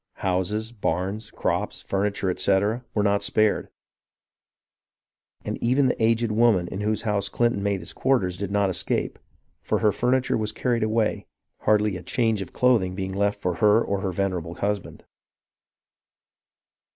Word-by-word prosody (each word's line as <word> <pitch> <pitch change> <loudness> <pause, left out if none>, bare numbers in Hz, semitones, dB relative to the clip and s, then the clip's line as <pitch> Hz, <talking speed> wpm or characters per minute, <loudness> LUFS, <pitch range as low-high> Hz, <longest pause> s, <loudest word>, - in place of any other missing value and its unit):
Houses, 95 +5 -1
barns, 100 +1 -2
crops, - - -2
furniture, 100 -1 -1
etc., 100 +6 +1
were 105 - +2
not 100 0 +2
spared, 110 -1 +1 1.8
and - - -4
even 130 +4 +3
the 125 -3 0
aged 115 0 +2
woman 105 -5 +3
in 95 - -5
whose 110 +1 -1
house 105 -3 0
Clinton 120 -4 +1
made 100 -2 -1
his 85 - -9
quarters 105 -10 +1
did 100 +1 -4
not 100 -1 +1
escape, - - -2 0.4
for - - 0
her 105 - +3
furniture 125 +2 +1
was 110 -1 -1
carried 120 -2 -1
away, 110 0 0 0.3
hardly 105 -2 +2
a - - -9
change 110 +3 0
of 95 - -7
clothing 110 -8 +2
being 95 0 -4
left 100 +1 0
for 90 -3 -2
her 105 +4 +5
or 100 -4 -1
her 95 - -1
venerable 90 -3 -2
husband. 100 -1 -3
105 Hz, 150 wpm, -25 LUFS, 95-110 Hz, 1.8 s, her